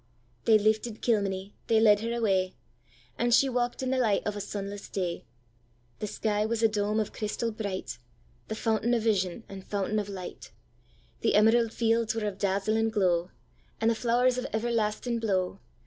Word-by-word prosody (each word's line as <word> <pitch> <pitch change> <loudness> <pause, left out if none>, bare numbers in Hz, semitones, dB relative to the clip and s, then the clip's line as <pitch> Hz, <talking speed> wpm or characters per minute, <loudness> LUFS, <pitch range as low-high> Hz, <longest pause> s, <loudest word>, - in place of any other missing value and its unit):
'—They 225 -2 +7
lifted 215 +1 0
Kilmeny, 200 -3 0
they 225 -1 +4
led 210 -2 +6
her 230 +2 -3
away, 195 -6 +1 0.6
And 240 0 +2
she 275 - +4
walk'd 245 0 -1
in 260 - -1
the 265 - +1
light 215 -5 +2
of 210 - -2
a 205 - -4
sunless 200 0 -6
day; 180 -3 -3 0.7
The 210 - -3
sky 210 0 0
was 230 +1 -1
a - - +7
dome 210 0 0
of 215 - -2
crystal 225 +2 -2
bright, 200 - -5 0.5
The 220 - -4
fountain 225 +2 +1
of 230 - 0
vision, 200 -2 0
and 195 -1 -9
fountain 205 +2 -1
of 205 -1 -4
light:The 185 -3 -6
emerald 225 +2 +4
fields 230 -1 +1
were 225 -1 -2
of 200 -2 -4
dazzling 210 +3 +1
glow, 180 -5 +1 0.5
And 225 +1 +3
the - - +3
flowers 245 +2 +2
of 250 - -3
everlasting 230 +1 -1
blow. 190 -3 -1
215 Hz, 170 wpm, -28 LUFS, 200-230 Hz, 0.7 s, They